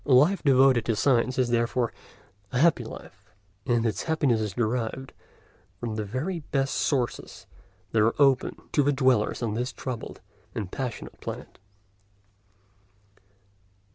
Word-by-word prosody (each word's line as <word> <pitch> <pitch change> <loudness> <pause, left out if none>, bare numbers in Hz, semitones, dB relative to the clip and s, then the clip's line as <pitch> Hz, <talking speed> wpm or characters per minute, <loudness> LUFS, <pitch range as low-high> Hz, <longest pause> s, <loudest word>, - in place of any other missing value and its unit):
A 140 - +2
life 155 +10 +4
devoted 135 -4 +4
to 115 - +1
science 125 +1 +2
is 125 -2 +2
therefore 120 0 0 0.6
a 125 - -1
happy 150 -3 +4
life, 100 -3 -11 0.4
and 120 -1 +2
its 105 -3 -1
happiness 145 -8 +1
is 105 -2 -3
derived 120 +2 -2 0.7
from 120 -2 -3
the 110 0 -2
very 135 - -3
best 135 -2 -1
sources 130 -5 -2 0.5
that 110 - +3
are 115 +5 +2
open 135 -2 +3 0.2
to 145 -1 +3
dwellers 130 -5 +2
on 110 -3 -1
this 125 +3 -2
troubled 125 -3 -6 0.4
and 105 -6 -4
passionate 130 -4 -5
planet. - - -7
125 Hz, 135 wpm, -26 LUFS, 115-135 Hz, 0.7 s, life